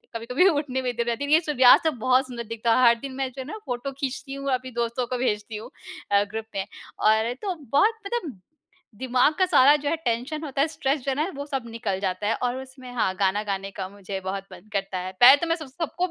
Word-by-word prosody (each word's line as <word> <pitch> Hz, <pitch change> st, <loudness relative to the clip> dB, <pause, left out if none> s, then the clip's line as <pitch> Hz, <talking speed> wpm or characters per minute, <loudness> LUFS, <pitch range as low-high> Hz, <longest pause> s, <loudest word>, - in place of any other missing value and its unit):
कभी-कभी 250 Hz, +10 st, +2 dB
उठने 285 Hz, -5 st, -1 dB
में 250 Hz, -1 st, -1 dB
जरा 235 Hz, 0 st, 0 dB
देर 285 Hz, +3 st, -4 dB
ये 310 Hz, +2 st, +6 dB
सूर्यास्त 290 Hz, -1 st, +5 dB
बहुत 255 Hz, +3 st, +3 dB
सुंदर 240 Hz, -2 st, -6 dB
दिखता 230 Hz, 0 st, 0 dB
है, 255 Hz, -1 st, +5 dB
हर 235 Hz, -, +6 dB
दिन 275 Hz, +2 st, -7 dB
मैं 270 Hz, 0 st, -1 dB
जो 265 Hz, +1 st, -7 dB
है -, -, -7 dB
ना 430 Hz, -, -6 dB
फ़ोटो 245 Hz, +2 st, -3 dB
खींचती 275 Hz, 0 st, -5 dB
हूँ। 275 Hz, 0 st, -3 dB
अभी 255 Hz, 0 st, -3 dB
दोस्तों 235 Hz, +1 st, -2 dB
को 250 Hz, -, -2 dB
भेजती 215 Hz, -3 st, -2 dB
हूँ 215 Hz, -, -9 dB, 0.4 s
अ, 200 Hz, 0 st, +5 dB
ग्रुप 215 Hz, +2 st, -6 dB
में 195 Hz, -1 st, -1 dB, 0.3 s
और 220 Hz, +2 st, +3 dB
तो 385 Hz, -3 st, -2 dB, 0.2 s
बहुत 410 Hz, +11 st, +4 dB
मतलब 375 Hz, -, -4 dB, 0.6 s
दिमाग 255 Hz, +3 st, +3 dB
का 375 Hz, -, +5 dB
सारा 290 Hz, -5 st, +6 dB
जो 290 Hz, -1 st, -2 dB
है 330 Hz, -, +1 dB
टेंशन 250 Hz, +7 st, -2 dB
होता 275 Hz, -2 st, -2 dB
है, 295 Hz, -, +3 dB
स्ट्रेस 290 Hz, -2 st, -1 dB
जो 275 Hz, -, +1 dB
है 325 Hz, -, 0 dB
वो 285 Hz, -2 st, -6 dB
सब 270 Hz, -3 st, -3 dB
निकल 205 Hz, -4 st, -3 dB
जाता 190 Hz, +1 st, -2 dB
है 225 Hz, -, +2 dB
और 245 Hz, 0 st, 0 dB
उसमें 260 Hz, -1 st, -11 dB
हाँ 205 Hz, -5 st, +1 dB
गाना 200 Hz, +1 st, +1 dB
गाने 195 Hz, -1 st, -4 dB
का 190 Hz, -1 st, -5 dB
मुझे 200 Hz, -1 st, -6 dB
बहुत 195 Hz, +1 st, -3 dB
मन -, -, -14 dB
करता 195 Hz, -1 st, -2 dB
है। 185 Hz, +1 st, -5 dB
पहले 250 Hz, +3 st, +11 dB
तो 340 Hz, -, -1 dB
मैं 330 Hz, -, +2 dB
सब 310 Hz, -4 st, -9 dB
सबको 330 Hz, +6 st, -3 dB
255 Hz, 240 wpm, -25 LUFS, 220-280 Hz, 0.6 s, पहले